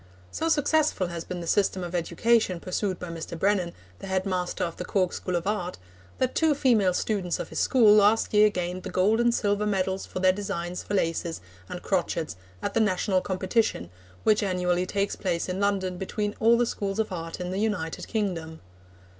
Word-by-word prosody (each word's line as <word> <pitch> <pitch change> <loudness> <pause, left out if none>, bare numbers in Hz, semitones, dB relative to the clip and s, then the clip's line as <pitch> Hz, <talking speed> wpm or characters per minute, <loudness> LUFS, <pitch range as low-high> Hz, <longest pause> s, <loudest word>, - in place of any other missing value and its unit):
So 325 - -1
successful 300 - +2
has 170 -1 -5
been 180 -1 -6
the - - -6
system 190 +1 +1
of 175 0 -6
education 180 +3 +1
pursued 185 +1 -2
by 180 - -7
Mr. 165 0 -6
Brennan, 190 -1 +1 0.3
the - - -8
head 190 0 0
master 180 -2 -2
of 170 -1 -3
the - - -4
Cork 185 -1 0
School 180 - -3
of 170 0 -1
Art, 195 -3 -2 0.4
that 255 -1 0
two 315 -2 +3
female 215 -9 +3
students 190 -5 -1
of - - -5
his - - -4
school 225 -5 +5
last 210 +2 +4
year 210 0 +6
gained 180 -2 -3
the - - -6
gold 205 +5 +2
and 240 0 +4
silver 210 -2 0
medals 190 -1 -1
for - - -7
their 185 0 +4
designs 180 -3 -4
for 205 - -3
laces 165 -2 -1 0.3
and 180 - -6
crochets 170 -4 -1 0.3
at - - -2
the - - +2
national 190 -2 +2
competition 190 - -1 0.3
which 215 -1 +4
annually 180 -2 0
takes 200 0 -1
place 175 -4 -2
in 185 +1 -3
London 190 -3 0
between 205 +2 -2
all 230 +1 +5
the 240 - +3
Schools 200 -3 -3
of 220 -2 -1
Art 165 -1 -5
in 180 0 -4
the 190 - -2
United 200 -7 -2
Kingdom. 170 -7 -3
190 Hz, 195 wpm, -26 LUFS, 180-210 Hz, 0.4 s, year